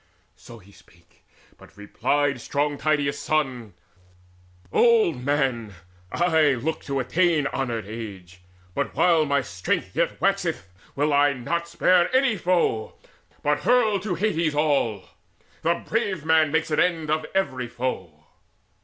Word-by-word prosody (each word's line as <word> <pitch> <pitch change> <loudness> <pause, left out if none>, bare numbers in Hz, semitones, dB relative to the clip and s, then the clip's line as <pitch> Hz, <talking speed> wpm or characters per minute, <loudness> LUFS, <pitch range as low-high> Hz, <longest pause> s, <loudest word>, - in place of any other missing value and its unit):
So 120 -1 -14
spake 90 -2 -23
he; - - -35 0.2
but - - -18
replied 130 +6 -1
strong 145 +2 -2
Tydeus' 145 -2 0
son: 130 - -2 1.0
"Old 220 - +3
man, 130 -7 -1 0.4
I 160 -4 +3
look 155 +7 -3
to 140 -1 -2
attain 160 +4 +1
to - - -3
honoured 120 -5 -2
age; 100 -5 -9 0.3
But - - -3
while 165 -3 +3
my 140 -2 +1
Strength 90 -6 -3
yet - - 0
waxeth, 90 - -1 0.3
will 145 +2 +1
not 145 -4 +1
I - - -14
Spare 175 +5 +2
any 260 -4 +3
foe, 170 - 0 0.5
but 145 0 +1
hurl 220 -2 +2
to 190 -2 -3
Hades 170 -5 0
all. 140 -10 0 0.5
The 170 +1 0
brave 200 -8 -1
man 160 -2 +3
makes 160 0 0
an 150 - +1
end 165 -4 +1
of 155 0 -1
every 130 -10 -1
foe." 95 -11 -5
145 Hz, 135 wpm, -24 LUFS, 120-170 Hz, 1.0 s, Old